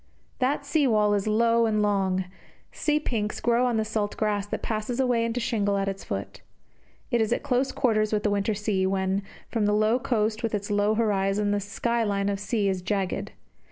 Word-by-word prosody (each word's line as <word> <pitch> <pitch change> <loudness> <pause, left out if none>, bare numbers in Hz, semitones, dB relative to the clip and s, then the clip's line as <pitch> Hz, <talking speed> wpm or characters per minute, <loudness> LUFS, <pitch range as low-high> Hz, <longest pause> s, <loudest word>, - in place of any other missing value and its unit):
That 280 +2 0
sea 285 0 +2
wall 210 -3 +3
is 205 0 0
low 230 +1 +3
and 215 -1 +1
long; 190 -2 +1 0.5
sea 300 0 0
pinks 220 -8 -2
grow 240 +1 +2
on 240 -2 0
the 220 - 0
salt 215 -1 -2
grass 205 -2 0
that - - -4
passes 220 +3 -2
away 245 -3 +2
into 230 +1 -1
shingle 205 -4 0
at 195 0 -1
its 195 0 -4
foot. 95 -1 -5 0.7
It 240 - +2
is 220 - 0
at - - 0
close 265 -1 +1
quarters 215 -4 +1
with 210 -1 0
the 210 - +1
winter 205 +1 0
sea, 195 -2 0
when, 190 0 0 0.3
from 220 -3 0
the 210 - +2
low 215 +3 +3
coast 220 -4 0
with 225 -2 -1
its 205 0 -4
low 205 +1 +2
horizon, 205 -2 +1
the 205 - +1
sky 230 +4 -1
line 200 -1 0
of 200 -1 -2
sea 205 0 0
is 190 -2 -1
jagged. 195 -1 -2
210 Hz, 205 wpm, -26 LUFS, 200-230 Hz, 0.7 s, wall